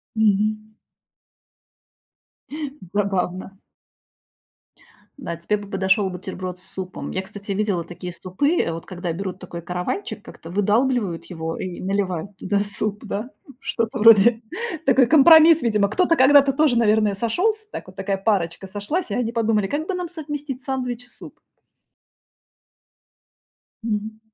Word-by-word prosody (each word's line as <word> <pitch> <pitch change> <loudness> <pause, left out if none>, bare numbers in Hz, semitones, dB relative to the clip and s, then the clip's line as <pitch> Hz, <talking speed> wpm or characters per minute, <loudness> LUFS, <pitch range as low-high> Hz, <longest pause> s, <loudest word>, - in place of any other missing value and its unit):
Мгм. 215 0 +2 2.3
Забавно. 190 -1 -1 1.6
Да, 170 -12 -5
тебе 170 +5 -1
бы 205 -1 -10
подошёл 190 +1 +1
бутерброд 185 0 -6
с - - -17
супом. 185 -1 -6
Я, 190 - -2
кстати, 200 +1 -8
видела 195 -4 0
такие 180 +1 -7
супы, 190 - -1 0.2
вот 165 - -7
когда 180 -2 -4
берут 185 +1 -5
такой 175 -2 -8
каравайчик, 180 - -4
как-то 165 - -12
выдалбливают 205 -1 +1
его 165 -2 -5
и 185 -2 -5
наливают 195 -1 -2
туда 200 +2 0
суп, 205 +1 -3
да, 215 +3 -4 0.3
что-то 230 -4 -2
вроде. 225 +1 +7 0.4
Такой 265 -2 +5
компромисс, 320 +3 +8
видимо. 210 -4 +2
Кто-то 335 - +2
когда-то 275 +1 +6
тоже, 275 -3 +3
наверное, 215 -2 +3
сошёлся, 380 - 0
так - - -7
вот, 185 - -13
такая 195 +1 -2
парочка 195 -3 -1
сошлась, 210 - -3
и - - -1
они 240 -2 -1
подумали, 225 -3 +1
как 300 - -3
бы 385 - -1
нам 360 -2 -3
совместить 295 -5 -6
сандвич 250 -3 -3
и - - -21
суп? 235 - -13 2.4
Мгм. 215 0 -3
210 Hz, 130 wpm, -22 LUFS, 190-250 Hz, 2.4 s, компромисс